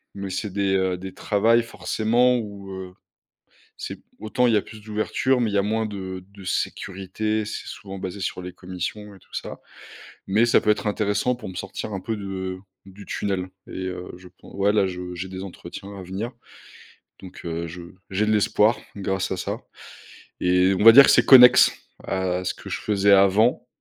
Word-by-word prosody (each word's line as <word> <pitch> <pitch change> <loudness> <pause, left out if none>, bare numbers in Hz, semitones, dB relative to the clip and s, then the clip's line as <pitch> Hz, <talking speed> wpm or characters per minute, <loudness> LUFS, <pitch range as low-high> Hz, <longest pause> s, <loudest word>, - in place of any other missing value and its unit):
mais 100 -1 -5
c'est 95 +2 -3
des, 100 -1 +1
heu, 95 -1 +1
des 95 +1 -8
travails 115 +3 +2
forcément 120 +2 +1
où, 100 -3 -7
heu, 95 -1 -7 0.8
c'est - - -6
p - - -28 0.2
autant 110 +3 0
il 115 - +3
y - - +5
a - - +2
plus 110 -1 -12
d'ouverture 110 +4 0
mais 115 - +1
il - - -6
y - - +4
a - - +4
moins 110 +1 0
de 95 -2 -6
de 100 -1 -13
sécurité. 100 +4 -2
C'est - - -6
souvent 95 -1 -8
basé 95 +1 -6
sur 90 - -3
les 90 0 -7
commissions 95 +3 -6
et - - -17
tout - - -27
ça. - - -6 0.7
Mais 105 +5 +3
ça 120 - +4
peut 105 - +3
être 105 - -1
intéressant 105 +4 0
pour 110 -6 -8
me - - -9
sortir 100 +2 -5
un 95 - -3
peu 110 +1 -3
de 95 -2 -5 0.3
du 95 +1 -13
tunnel 95 -2 -2 0.2
et 95 0 -6
heu, 90 -1 -6
je 90 0 -14
pen 90 - -18
ouais, 100 +1 +2
là, 100 -3 +3
je 90 -1 -6
j'ai 95 +2 -5
des 95 0 -6
entretiens 100 +2 -9
à 95 - -8
venir 100 +7 -5 0.9
donc, 95 - -11
heu, 85 0 -3
je 90 +1 -9 0.3
j'ai 105 +3 0
de 110 - +2
l'espoir, 105 +2 +3 0.2
grâce 95 -1 -2
à - - -2
ça - - -4 0.8
et 90 +1 +3
on 105 - +1
va 115 - +11
dire 140 +4 +10
que - - +5
c'est - - +5
connexe 125 -1 +9 0.3
à 90 -1 -1
ce - - -1
que - - -11
je - - -3
faisais 100 -1 +2
avant 100 +6 +4
100 Hz, 205 wpm, -24 LUFS, 95-110 Hz, 0.9 s, va